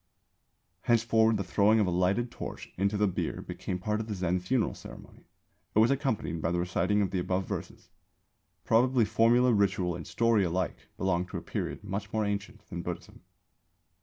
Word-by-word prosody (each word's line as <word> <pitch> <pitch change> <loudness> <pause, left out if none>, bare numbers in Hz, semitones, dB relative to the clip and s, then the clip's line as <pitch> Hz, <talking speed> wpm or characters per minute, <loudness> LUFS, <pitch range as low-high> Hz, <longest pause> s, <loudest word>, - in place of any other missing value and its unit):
_ - - -22
Henceforward 115 -1 +4
the 100 - -2
throwing 105 +4 +3
of 105 - +3
a 90 - -1
lighted 95 +7 +1
torch - - -7
into 100 +2 0
the 105 - +3
bier 95 - -2
became 90 - -4
part 105 +4 -1
of 110 - -4
the 105 - -3
Zen 90 -1 0
funeral 105 +6 0
ceremony; - - -13 0.5
it - - +2
was 115 +4 +5
accompanied 130 - -1
by 80 - 0
the 90 - 0
reciting 90 +4 +1
of 95 - -2
the 95 - 0
above 90 +1 -1
verses. - - -7 0.7
Probably 120 +1 +3
formula, 115 +3 +4
ritual, 95 -4 +1
and 85 - -7
story 115 -3 +2
alike 90 +1 -1 0.2
belong 90 -1 0
to - - -5
a - - -5
period - - -4
much 100 0 -4
more 110 -1 0
ancient 105 +2 -4
than 85 -3 -4
Buddhism. 90 0 -7
100 Hz, 185 wpm, -29 LUFS, 90-110 Hz, 0.7 s, was